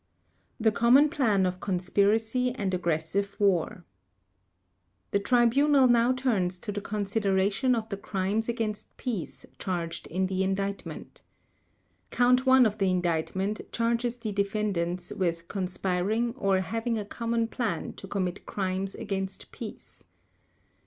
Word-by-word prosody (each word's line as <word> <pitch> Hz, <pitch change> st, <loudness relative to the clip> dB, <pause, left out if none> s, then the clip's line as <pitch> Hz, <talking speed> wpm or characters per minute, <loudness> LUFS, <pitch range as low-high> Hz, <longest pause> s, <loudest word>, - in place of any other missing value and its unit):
The 220 Hz, -1 st, +3 dB
Common 245 Hz, +7 st, +5 dB
Plan 225 Hz, -, +2 dB
of 180 Hz, 0 st, -2 dB
Conspiracy 210 Hz, +6 st, +1 dB
and 200 Hz, -6 st, -2 dB
Aggressive 180 Hz, +3 st, -1 dB
War 180 Hz, -3 st, +1 dB, 1.3 s
The 200 Hz, -, +2 dB
Tribunal 255 Hz, +5 st, +4 dB
now 240 Hz, 0 st, +4 dB
turns 220 Hz, -9 st, 0 dB
to 210 Hz, -, -4 dB
the 205 Hz, 0 st, -4 dB
consideration 205 Hz, +3 st, +1 dB
of 225 Hz, -1 st, -3 dB
the 200 Hz, -, -3 dB
Crimes 200 Hz, +3 st, -1 dB
against 225 Hz, -3 st, -3 dB
Peace 230 Hz, -10 st, -4 dB
charged 170 Hz, -2 st, -3 dB
in 185 Hz, +3 st, 0 dB
the 190 Hz, 0 st, -1 dB
Indictment. 195 Hz, +1 st, -3 dB, 0.9 s
Count 250 Hz, +1 st, +3 dB
One 260 Hz, -1 st, +7 dB
of 215 Hz, 0 st, -1 dB
the 195 Hz, -1 st, +2 dB
Indictment 185 Hz, +3 st, -1 dB
charges 235 Hz, +1 st, 0 dB
the 225 Hz, -3 st, -4 dB
defendants 195 Hz, -4 st, -1 dB
with 170 Hz, -5 st, -2 dB
conspiring 195 Hz, +4 st, -1 dB
or 195 Hz, -6 st, +1 dB
having 225 Hz, +5 st, -2 dB
a 210 Hz, -, -3 dB
common 230 Hz, +2 st, -1 dB
plan 225 Hz, -8 st, -3 dB
to 195 Hz, -, -10 dB
commit 190 Hz, -1 st, -2 dB
crimes 190 Hz, 0 st, -2 dB
against 195 Hz, -1 st, -5 dB
peace. -, -, -10 dB
200 Hz, 125 wpm, -28 LUFS, 185-230 Hz, 1.3 s, One